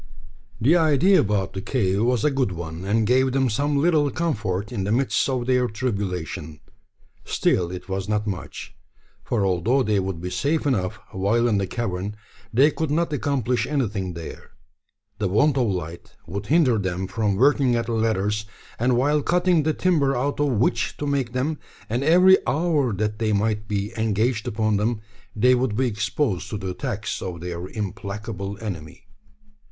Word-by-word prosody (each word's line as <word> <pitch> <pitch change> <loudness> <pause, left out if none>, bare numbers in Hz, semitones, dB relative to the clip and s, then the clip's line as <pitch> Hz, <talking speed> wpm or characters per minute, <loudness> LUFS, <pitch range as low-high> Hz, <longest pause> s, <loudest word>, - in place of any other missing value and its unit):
The 135 +9 +4
idea 165 +3 +4
about 100 -2 0
the 95 - -4
cave 100 -3 0
was 120 0 +1
a 150 - +3
good 135 -6 0
one, 85 0 -6
and 110 +2 +2
gave 130 +3 +3
them 130 -3 +2
some 145 +6 0
little 150 -1 +3
comfort 110 - -2
in 105 -6 -2
the 100 - -1
midst 130 +3 +1
of 130 -2 -1
their 125 -1 +2
tribulation. 95 - -4 0.6
Still, 85 -2 +1
it 90 0 -7
was 95 +1 -3
not 105 0 0
much; 100 -4 -6 0.5
for 105 -5 0
although 95 +9 +2
they 105 -3 +1
would 95 -3 -3
be 90 +2 -5
safe 150 +2 0
enough 100 -10 0
while 110 +5 +1
in 105 -4 +2
the 95 - -1
cavern, 100 -3 -3 0.4
they 135 +6 +5
could 160 +1 -2
not 160 +1 0
accomplish 130 -3 0
anything 105 - -2
there. 85 -2 -9 0.7
The 105 - +1
want 140 +10 +3
of 125 -3 +2
light 85 -4 -5
would 100 +4 -5
hinder 140 -8 +3
them 95 -1 -2
from 100 +1 -1
working 135 +1 +3
at 115 0 0
the 120 - -4
ladders; 105 -2 0 0.3
and 120 +1 +2
while 145 +4 +2
cutting 175 +1 +2
the 155 +1 +1
timber 150 -7 +2
out 140 +4 -1
of 145 - +2
which 115 +1 0
to 145 - -3
make 135 -4 -1
them, 140 +4 -1 0.3
and 120 +5 -1
every 180 +5 +6
hour 150 -5 +1
that 105 +2 -2
they 110 -1 +1
might 105 +1 0
be 105 +1 -2
engaged 110 +1 0
upon 110 -2 +1
them, 110 +2 0 0.4
they 125 +4 +4
would 125 -4 +1
be 130 +4 +1
exposed 110 - -1
to 105 - -3
the 95 -2 -4
attacks 105 +3 -4
of 90 -3 -5
their 85 +1 -5
implacable 100 0 -5
enemy. 85 -7 -7
110 Hz, 175 wpm, -23 LUFS, 100-135 Hz, 0.7 s, every